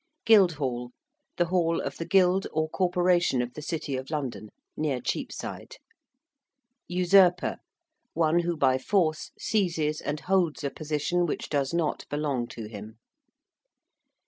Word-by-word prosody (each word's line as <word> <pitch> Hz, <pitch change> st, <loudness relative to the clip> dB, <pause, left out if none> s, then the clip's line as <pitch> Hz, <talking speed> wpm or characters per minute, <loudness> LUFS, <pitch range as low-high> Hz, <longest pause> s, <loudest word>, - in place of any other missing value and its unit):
~Guildhall~: 145 Hz, -, +3 dB, 0.4 s
the 175 Hz, -, +3 dB
hall 170 Hz, -1 st, +1 dB
of -, -, -4 dB
the 165 Hz, -, -5 dB
Guild 190 Hz, 0 st, +3 dB
or 155 Hz, 0 st, 0 dB
Corporation 175 Hz, -4 st, +2 dB
of 125 Hz, 0 st, -2 dB
the 150 Hz, -, -8 dB
City 150 Hz, -2 st, -3 dB
of 130 Hz, +1 st, -5 dB
London, 135 Hz, -8 st, -4 dB, 0.3 s
near 145 Hz, -4 st, -1 dB
Cheapside. -, -, -5 dB, 1.1 s
~usurper~: 180 Hz, 0 st, +4 dB, 0.6 s
one 165 Hz, +1 st, +2 dB
who 170 Hz, -1 st, -1 dB
by 130 Hz, -3 st, +3 dB
force 160 Hz, 0 st, 0 dB
seizes 165 Hz, -7 st, 0 dB
and 150 Hz, +1 st, -3 dB
holds 180 Hz, -5 st, +1 dB
a 140 Hz, -, -1 dB
position 155 Hz, +4 st, -1 dB
which -, -, -4 dB
does 140 Hz, -2 st, 0 dB
not 170 Hz, -3 st, -1 dB
belong 145 Hz, -5 st, -1 dB
to 115 Hz, -, -8 dB
him. 105 Hz, +1 st, -9 dB
155 Hz, 130 wpm, -27 LUFS, 140-175 Hz, 1.1 s, ~usurper~